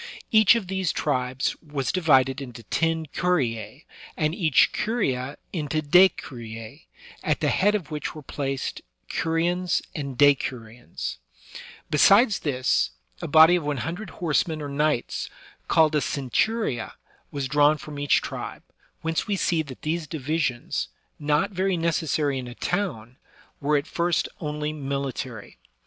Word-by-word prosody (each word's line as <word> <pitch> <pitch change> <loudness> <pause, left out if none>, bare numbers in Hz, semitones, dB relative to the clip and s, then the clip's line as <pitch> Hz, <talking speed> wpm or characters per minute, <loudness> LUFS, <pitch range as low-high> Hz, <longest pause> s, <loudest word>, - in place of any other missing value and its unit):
Each 220 0 +7
of 230 -4 -1
these 190 -2 -1
tribes 130 -2 -1
was 145 -4 -3
subdivided 135 -6 +3
into 120 -3 -9
ten 165 +6 0
curia^ 135 - -1 0.3
and 155 0 +1
each 160 - +4
curia 140 - -1 0.2
into 155 -3 -1
decuricB^ 130 -9 +1 0.4
at - - +1
the - - +1
head 205 +2 +3
of 165 -7 -4
which 150 +1 -4
were 155 - -9
placed 135 -1 -3 0.3
curiones 170 +2 0
and 140 -4 -5
decuriones, 125 -6 0 0.4
/ - - -14
Besides 200 - +5
this, 130 -4 +1 0.3
a - - -3
body 160 +3 +7
of 175 - -1
one 145 -1 -1
hundred 175 +5 -5
horsemen 160 -1 0
or 145 -1 -5
knights, 150 -2 -1 0.4
called 160 -2 +4
a 150 - +3
centuria^ 140 - -1 0.4
was 140 -2 -3
drawn 145 +2 +4
from 145 +1 -8
each 145 -2 +2
tribe, - - -6 0.4
whence 165 0 -1
we 205 - +1
see 170 -3 +1
that 140 -5 -10
these 160 +1 -2
divisions, 145 -4 -2 0.3
not 150 +7 +1
very 190 -1 0
necessary 155 -4 0
in 125 - -6
a 120 - -9
town, 130 - -3 0.4
were 150 +1 +2
at 140 - -2
first 170 +1 0
only 150 -1 -3
military. 135 -5 -5
150 Hz, 140 wpm, -25 LUFS, 135-170 Hz, 0.4 s, Each